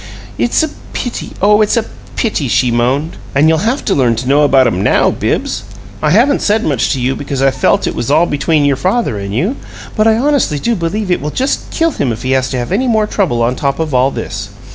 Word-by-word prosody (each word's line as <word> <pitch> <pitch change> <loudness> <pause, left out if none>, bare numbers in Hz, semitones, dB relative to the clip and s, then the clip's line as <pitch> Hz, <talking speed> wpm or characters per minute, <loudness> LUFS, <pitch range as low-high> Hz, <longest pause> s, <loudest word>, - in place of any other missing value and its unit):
"It's 240 - +2
a 315 - -1 0.2
pity! 245 - -5
Oh, 210 +1 +5
it's 215 +3 +2
a 225 - 0 0.3
pity!" 210 - -1
she 125 +1 +2
moaned. 130 +7 0 0.2
"And 145 +3 +4
you'll 160 0 +3
have 265 +4 -3
to - - +1
learn 125 -4 +2
to 120 +3 -4
know 140 +2 +4
about 135 -3 +4
'em 105 -6 0
NOW, - - +3
Bibbs! 100 - -2 0.4
I 150 - +1
haven't 245 - +3
said 215 +1 +1
much 135 -6 0
to 135 - -3
you, 130 +2 0
because 140 -1 -4
I 135 0 +3
felt 130 0 +1
it - - -2
was 120 - -3
all 155 +4 +4
between 150 0 +1
your 140 -2 +2
father 185 - 0
and 100 0 -5
you, 180 - -1 0.4
but 215 0 +2
I 220 0 +4
honestly 275 - +1
do 235 +11 0
believe 185 +3 -2
it 175 - +1
will 150 - -3
just 265 - -2
kill 330 -1 0
him 135 - -1
if 115 +1 -6
he 130 - -1
has 130 0 +1
to 130 - -3
have 120 +4 -4
any 245 +7 +1
more 220 -3 +2
trouble 175 - 0
on 120 +2 0
top 140 0 -1
of 160 -3 -3
all 130 +1 +3
this! - - -5
150 Hz, 245 wpm, -14 LUFS, 130-215 Hz, 0.4 s, Oh